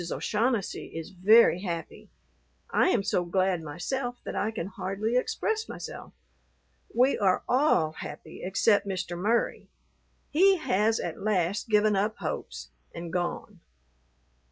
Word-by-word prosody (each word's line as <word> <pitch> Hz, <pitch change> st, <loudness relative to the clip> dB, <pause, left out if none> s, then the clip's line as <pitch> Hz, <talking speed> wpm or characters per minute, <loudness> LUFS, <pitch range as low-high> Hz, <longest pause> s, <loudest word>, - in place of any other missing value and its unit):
O'Shaughnessy 225 Hz, -2 st, -1 dB
is 165 Hz, -, -6 dB
very 190 Hz, 0 st, +5 dB
happy. 170 Hz, -4 st, -6 dB, 0.6 s
I -, -, +3 dB
am 220 Hz, -, +2 dB
so 190 Hz, -3 st, +1 dB
glad 185 Hz, 0 st, 0 dB
myself 245 Hz, -, -4 dB
that -, -, -6 dB
I 210 Hz, -, 0 dB
can 215 Hz, -6 st, -4 dB
hardly 195 Hz, +4 st, -3 dB
express 440 Hz, -, -1 dB
myself. -, -, -8 dB, 0.8 s
We 255 Hz, +3 st, +3 dB
are 190 Hz, -3 st, +2 dB
all 250 Hz, -, +3 dB
happy 155 Hz, 0 st, -9 dB
except 200 Hz, +2 st, +2 dB
Mr. 180 Hz, -2 st, -3 dB
Murry; 215 Hz, +7 st, 0 dB, 0.6 s
he 380 Hz, +5 st, +5 dB
has 220 Hz, -, +1 dB
at 170 Hz, -, -5 dB
last 200 Hz, +1 st, 0 dB
given 210 Hz, -1 st, +4 dB
up 210 Hz, +3 st, 0 dB
hopes, -, -, -5 dB, 0.3 s
and 170 Hz, 0 st, -7 dB
gone. 180 Hz, +2 st, -3 dB
205 Hz, 130 wpm, -28 LUFS, 180-230 Hz, 0.8 s, very